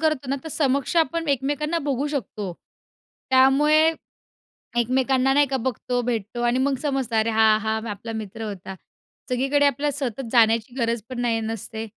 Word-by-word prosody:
करतो 310 -4 0
ना, 275 - 0
तर - - -5
समक्ष 280 +1 0
आपण 330 0 +1
एकमेकांना 290 +4 0
बघू 275 +1 0
शकतो, 215 -9 -4 0.8
त्यामुळे 295 +5 +5 0.9
एकमेकांना 260 +2 +2
नाही 290 0 +4
का 270 - -1
बघतो, 250 0 -1
भेटतो 240 -1 -3
अन् 240 +1 +2
मग 280 0 +1
समजतं, 270 -6 -1
"अरे 220 +1 +2
हां, 220 -1 +4
हां, 220 +1 -2
आपला 205 +3 -6
मित्र 220 0 -6
होता." 195 -3 -6 0.5
सगळीकडे 275 +3 +2
आपल्या 285 +2 +1
सतत 265 -3 -3
जाण्याची 230 0 +3
गरज 235 -3 -1
पण 255 -2 -5
नाही 230 -2 +1
नसते. 225 0 -5
255 Hz, 155 wpm, -23 LUFS, 225-280 Hz, 0.9 s, त्यामुळे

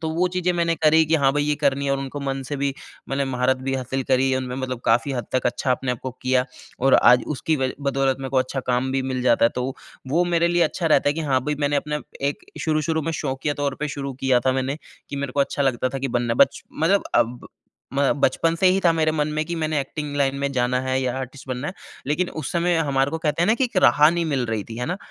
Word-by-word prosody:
तो 160 - -1
वो 175 +3 +1
चीज़ें 180 0 0
मैंने 170 -1 +1
करी 160 0 +4
कि 160 - +2
हाँ, 135 -3 +3
भई 145 0 +1
ये 150 0 +1
करनी 140 -1 +1
है - - +1
और 135 - 0
उनको 135 +1 -5
मन 135 -1 -3
से 145 - -3
भी 140 -1 0 0.3
मैंने 135 +1 0
महारत 130 0 +1
भी 135 - 0
हासिल 130 +1 -2
करी 130 0 +3
उनमें 125 -1 -4
मतलब 130 -2 -4
काफ़ी 120 +4 +2
हद 120 -2 -3
तक 130 -1 +1
अच्छा 130 +2 -1
अपने 125 0 0
आप 120 - -6
को 130 - -3
किया। 130 0 +2 0.4
और 135 +1 +4
आज 125 0 +6
उसकी 160 +2 0
वज 130 -1 -1
बदौलत 135 -1 +1
मेरे 135 -1 -5
को 135 - -1
अच्छा 130 +1 -1
काम 125 +1 0
भी 135 -1 0
मिल 130 -1 -2
जाता 120 -2 +4
है। 115 - +6
तो 125 0 -2 0.4
वो 170 +4 +3
मेरे 170 +1 +3
लिए 175 0 +2
अच्छा 165 +2 0
रहता 145 -2 +4
है - - +3
कि 165 - -3
हाँ, 135 -4 +1
भई 150 +1 0
मैंने 145 0 +1
अपना 150 +1 -2 0.3
एक 145 - -6 0.2
शुरू-शुरू 160 0 0
में 165 +2 -2
शौकिया 135 +1 -2
तौर 140 -1 0
पे 150 - -1
शुरू 140 -1 -4
किया 125 -2 +4
था 130 - +4
मैंने 135 +2 -1 0.3
कि 140 - -5
मेरे 140 -2 -3
को 140 - +1
अच्छा 140 +1 0
लगता 130 -1 +1
था। 135 +1 -4
कि 135 0 -2
बनना 120 -1 0
बच - - 0
मतलब 180 +6 +2
अब 120 +1 +1 0.5
म 140 - +1 0.2
बचपन 165 +5 +2
से 190 - +5
ही 190 +1 +4
था 170 - +6
मेरे 155 -1 +1
मन 150 -1 0
में 155 - 0
कि 170 - -3
मैंने 155 -2 0
एक्टिंग 145 +1 -5
लाइन 135 -1 +1
में 140 0 -1
जाना 125 0 +1
है 130 0 -1
या 125 -1 -1
आर्टिस्ट 130 +1 -8
बनना 130 +3 -3
है। 185 - -6 0.3
लेकिन 170 +5 0
उस 155 -4 -5
समय 175 0 +1
हमारे 140 -3 +1
को 160 - -3
कहते 160 +1 0
हैं - - +3
ना, 220 - +5
की 260 - +1
एक 235 -5 -5
राह 150 +1 +6
नहीं 170 0 -1
मिल 135 -5 0
रही 110 -3 -2
थी, 115 - -9
है 125 - -2
ना, 180 +3 -2
140 Hz, 270 wpm, -23 LUFS, 130-155 Hz, 0.5 s, आज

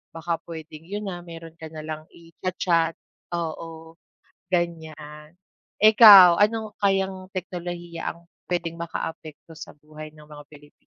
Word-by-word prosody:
baka 165 0 -3
pwedeng 160 -1 -9
yun 205 +1 -5
na, 175 -2 -5
meron 165 -1 -11
ka 160 - -7
na 155 -1 -8
lang 155 0 -6
i-cha-chat. 170 -1 -2 0.4
Oo, 165 0 -6 0.6
ganyan. 155 -2 -4 0.5
Ikaw, 205 -5 +9
ano 220 0 0
kayang 190 -1 0
teknolohiya 175 -2 -5
ang 170 0 -20 0.3
pwedeng 170 -1 -2
makaapekto 160 -1 -7
sa - - -10
buhay 155 +1 -11
ng 150 -1 -15
mga 150 -1 -12
Pilipino? 145 0 -18
165 Hz, 125 wpm, -24 LUFS, 155-180 Hz, 0.6 s, Ikaw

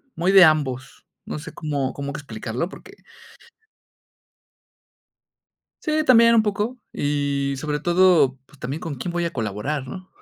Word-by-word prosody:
muy 175 +3 +1
de 195 -1 +9
ambos, 135 -4 -1 0.2
no - - -5
sé - - -10
cómo 140 -4 -3
cómo 140 0 -5
que 150 - -5
explicarlo, 120 +2 -4
porque. 405 - -14 2.9
Sí, 310 0 +1
también 230 -3 +6
un 225 - +5
poco, 215 +4 -2
y 140 -1 -1
sobre 150 +1 -3
todo, 170 -6 +4
pues, 145 - -21
también 135 +5 -5
con 160 -4 -5
quién 170 +8 -5
voy 175 0 -1
a 170 - -3
colaborar, 120 +5 -3
¿no? 185 +8 -9
150 Hz, 145 wpm, -22 LUFS, 135-185 Hz, 2.9 s, de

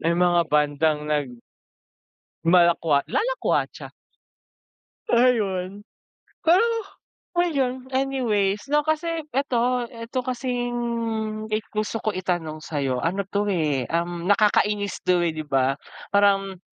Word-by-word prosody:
may 170 +1 +1
mga 175 -1 +4
bandang 150 +1 +2
nag 150 -2 0 1.2
lumalak 170 0 +5 0.3
lalakwatsa, - - -1 1.2
Ayun. 205 -6 +2 0.6
Pero, 350 +7 +5 0.7
ngayon 270 -7 0
anyways 230 -6 0
no 295 +1 +2
kasi 315 +2 0 0.2
eto, 250 -2 0
eto 230 +1 -4
kasing 235 -3 -2 0.2
gusto 215 +1 -2
ko 215 - +1
itanong 175 -4 -3
sayo 140 -5 -2
ano 190 +7 -1
to 205 +2 -1
eh, 150 - 0
um, 170 +1 -2
nakakainis 205 -1 +2
to 180 -1 +2
eh, 165 - 0
'di 155 - -5
'ba? 135 0 +1 0.3
Parang 195 -2 +2
205 Hz, 105 wpm, -24 LUFS, 170-245 Hz, 1.2 s, lumalak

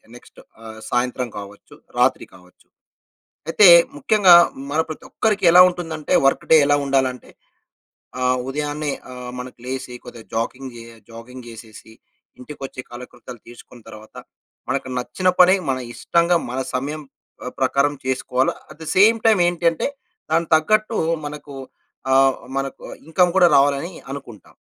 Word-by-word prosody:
Next 120 - -17 0.2
ఆహ్, 110 0 -10
సాయంత్రం 125 0 -2
కావచ్చు, 100 0 -11 0.2
రాత్రి - - +2
కావచ్చు. 90 0 -22 0.8
అయితే 200 +3 +6 0.3
ముఖ్యంగా 185 +3 +5 0.4
మన 155 - 0
ప్రతి 155 - -9
ఒక్కరికి 210 -3 0
ఎలా 180 +1 +8
ఉంటుందంటే 165 -4 -5
వర్క్ 135 - +1
డే - - +9
ఎలా 145 - +3
ఉండాలంటే 130 -2 -1 0.9
ఆహ్, 125 0 +1
ఉదయాన్నే 150 +1 -3 0.2
ఆహ్, 125 -1 -8
మనకి 125 0 -9
లేసి 130 -1 -6
కొద్దిగ 115 -2 -11
జాగింగ్ 130 +3 -4
జె 115 - -10 0.3
జాగింగ్ 120 +2 -11
జెసేసి, 110 -1 -13 0.5
ఇంటికి 140 +4 -11
ఒచ్చి 130 -1 -8
కాలకృతాలు 120 0 -11
తీసుకున్న 120 0 -15
తరువాత, 110 0 -14 0.5
మనకు 130 0 -2
నచ్చిన 185 +9 -3
పని 180 +1 +7
మన 130 - 0 0.2
ఇష్టంగా 170 +5 +1
మన 125 +2 -4 0.2
సమయం 145 +4 -4 0.4
ఆహ్, 125 - -7
ప్రకారం 140 +2 +1
చేసుకోవాలి. 130 0 -1 0.2
అట్ - - -15
ద 160 - -10
సేమ్ 220 +4 +5
టైమ్ 215 -5 +4
ఏంటి 175 -1 0
అంటే 165 - -3 0.4
దానికి 165 0 0
తగ్గట్టు 215 +7 +1 0.3
మనకు 145 -1 -9 0.6
ఆహ్, 135 0 +4 0.2
మనకు 135 0 -4 0.2
ఇన్కమ్ 175 +2 +1
కూడా 180 - +6
రావాలి 140 0 +4
అని 170 - -7 0.2
అనుకుంటాం. 130 -6 -11
135 Hz, 140 wpm, -20 LUFS, 125-165 Hz, 0.9 s, డే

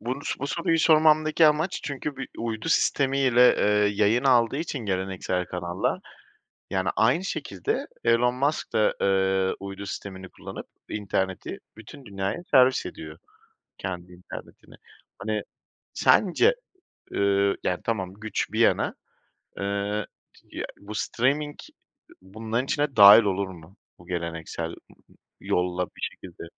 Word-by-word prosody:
Bunus 125 +6 -4
bu 140 - -2
soruyu 165 +3 0
sormamdaki 155 0 +5
amaç 155 +4 +1
çünkü 140 0 -4
bir 135 - -6
uydu 115 +5 -3
sistemiyle, 135 -5 +3
eee, 105 0 +3
yayın 110 +5 +2
aldığı 125 -1 +4
için 155 -3 -3
geleneksel 95 -3 -2
kanallar, 90 0 -2 0.7
yani, 95 -1 0
aynı 125 +11 +3
şekilde 100 - -3 0.2
Elon 120 +1 +3
Musk 145 +4 -1
da, 110 -1 +3
eee, 95 -1 +2
uydu 100 0 -7
sistemini 95 -2 -7
kullanıp - - -9 0.2
interneti 95 -2 -3 0.2
bütün 115 +4 -12
dünyaya 95 - -3
servis 130 -1 +5
ediyor - - -8 0.6
kendi 90 -1 -6
internetini. 90 +1 -12 0.4
Hani, 105 +1 -2 0.5
sence, 225 - +4 0.6
ııı, 100 0 +2
yani, 90 - 0
tamam 95 -5 -2
güç 110 +1 -3
bir - - -1
yana, - - +3 0.6
eee, 100 +1 -2 0.3
t - - -22 0.2
ya, - - -3 0.2
bu 105 +2 -9
streaming 145 +7 0 0.7
bunların 110 +5 -3
içine 145 -2 -1
dâhil 105 +2 +10
olur 100 -1 -1
mu? 90 +2 -13 0.2
Bu 85 - -17
geleneksel 85 -2 -4
m - - -15 0.4
yolla 90 0 -1
bir - - -17
şekilde. 90 -3 -7
105 Hz, 125 wpm, -25 LUFS, 95-135 Hz, 0.7 s, dâhil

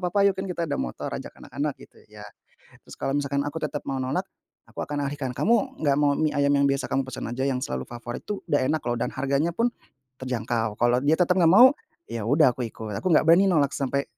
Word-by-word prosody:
apa-apa 180 +3 +1
yuk - - -4
kan 190 - -3
kita 175 -1 -3
ada 145 - -1
motor - - -4
ajak - - -5
anak-anak - - -4
gitu - - -17
ya - - -12 0.6
terus - - -12
kalau 135 - -1
misalkan 140 -1 -1
aku 145 - -5
tetap 150 -1 -2
mau 135 - -2
nolak, 130 - -2 0.4
aku - - -11
akan 145 -1 -3
alihkan 140 -2 -4
kamu 260 +4 +1
gak 140 - +3
mau 145 -1 +4
mie 155 -1 +1
ayam 140 0 +2
yang 140 0 +3
biasa 140 0 0
kamu 135 - +1
pesen 130 - -6
aja 125 +2 -3
yang 130 -2 0
selalu 65 0 -3
favorit 120 0 -7
itu 205 -1 -4
udah 145 - +4
enak 155 +1 0
loh 120 - 0
dan - - 0
harganya 140 +5 0
pun, 235 +4 +1 0.5
terjangkau 115 -4 -2
kalau 120 +1 +3
dia 150 +2 +4
tetap 180 0 +3
gak 170 - +5
mau 245 +7 +9 0.4
ya 115 -2 -3
udah 145 +1 +5
aku 125 -2 -3
ikut 110 -1 -8
aku - - -3
gak - - +5
berani 175 +4 +6
nolak 150 -7 +2
sampai, 140 0 -1
140 Hz, 235 wpm, -25 LUFS, 130-165 Hz, 0.6 s, mau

